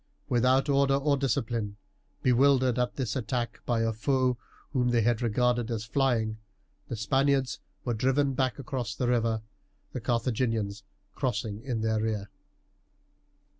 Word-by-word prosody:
Without 130 +3 +3
order 140 -1 +3
or 140 +1 +2
discipline, 115 -5 -1 0.5
bewildered 130 -1 +4
at 125 0 0
this 130 -3 -2
attack 120 -1 -2
by 120 -2 +2
a 115 0 +1
foe 130 +2 +1 0.4
whom 125 -2 +2
they 120 -1 +3
had 120 0 +2
regarded 120 +1 +1
as 110 -2 -3
flying, 110 -3 +1 0.5
the - - -4
Spaniards 135 +3 +1 0.3
were 120 - 0
driven 135 +4 +2
back 130 -1 0
across 130 -6 -4
the 125 - -1
river, 115 -2 +1 0.5
the - - -4
Carthaginians 115 -3 0 0.3
crossing 110 -5 -2
in 120 -3 -3
their 110 0 +1
rear. 105 -2 -2
120 Hz, 135 wpm, -28 LUFS, 110-130 Hz, 0.5 s, bewildered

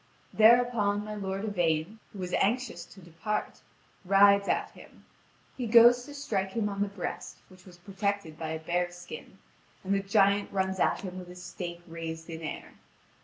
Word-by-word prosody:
Thereupon 220 -3 +4
my 215 - -6
lord 195 0 -4
Yvain, 175 0 -1
who - - -12
was 180 -1 -5
anxious 245 +4 0
to 195 - -16
depart, 175 +5 -4 0.4
rides 200 +1 +5
at - - 0
him. - - -17 0.5
He 250 -3 -3
goes 240 +2 +7
to 290 - -10
strike 195 -9 -2
him 220 -3 0
on 200 0 -4
the 205 - +2
breast, 200 -2 -6
which 185 0 -18
was 175 -1 -14
protected 195 -2 -3
by 160 0 -5
a 160 - -2
bear's 175 +2 -2
skin, 175 0 -10 0.5
and 195 +1 0
the 200 - +2
giant 200 +1 +2
runs 190 -1 -1
at - - +2
him 185 -1 -6
with 180 - -9
his 180 0 -11
stake 175 -1 -7
raised 165 0 -7
in 160 0 -7
air. 155 - -6
195 Hz, 175 wpm, -29 LUFS, 175-205 Hz, 0.5 s, goes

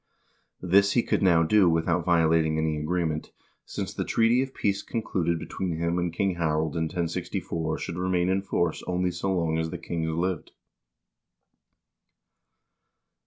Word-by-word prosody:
This 100 +2 +4
he 120 - +3
could - - 0
now 85 -3 +5
do 95 +2 +4
without 85 +1 +1
violating 80 -2 +3
any 80 0 0
agreement, 80 0 -2 0.4
since - - -4
the - - -2
treaty 115 +2 +3
of 135 0 -3
peace 100 -5 -1
concluded 85 -7 -1
between 85 +1 -4
him 85 +1 0
and 90 -1 -1
King 95 +1 -1
Harald 80 -2 0
in 80 -1 0
1064 80 -1 -3
should 85 - -5
remain 90 -1 +1
in 95 +1 +1
force 85 -4 -1
only 90 0 0
so 90 +3 -2
long 85 -3 0
as 80 0 -1
the 90 - -5
kings 80 -1 -3
lived. 85 +2 -2
85 Hz, 150 wpm, -26 LUFS, 80-95 Hz, 0.4 s, now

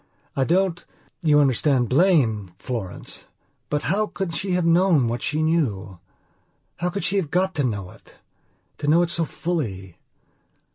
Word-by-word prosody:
I 135 - +1
don't, 175 +1 +1 0.4
you 150 -4 +4
understand, 135 -2 +2
blame 125 - +2
Florence. 110 -7 -6 0.4
But 150 0 -1
how 205 +6 +1
can 195 -4 -4
she 190 +2 -2
have 180 -1 +1
known 170 -6 +4
what 120 +1 -2
she 155 +1 -1
knew? 105 - -1 0.8
How 175 +1 -1
could 190 0 -4
she 185 +3 +1
have 175 -7 -1
got 185 +3 +1
to 150 -3 -1
know 100 -7 -3
it? - - -19 0.6
To 145 - -3
know 165 +4 +5
it 170 - -1
so 170 -1 +1
fully. 110 - -4
155 Hz, 155 wpm, -23 LUFS, 120-175 Hz, 0.8 s, know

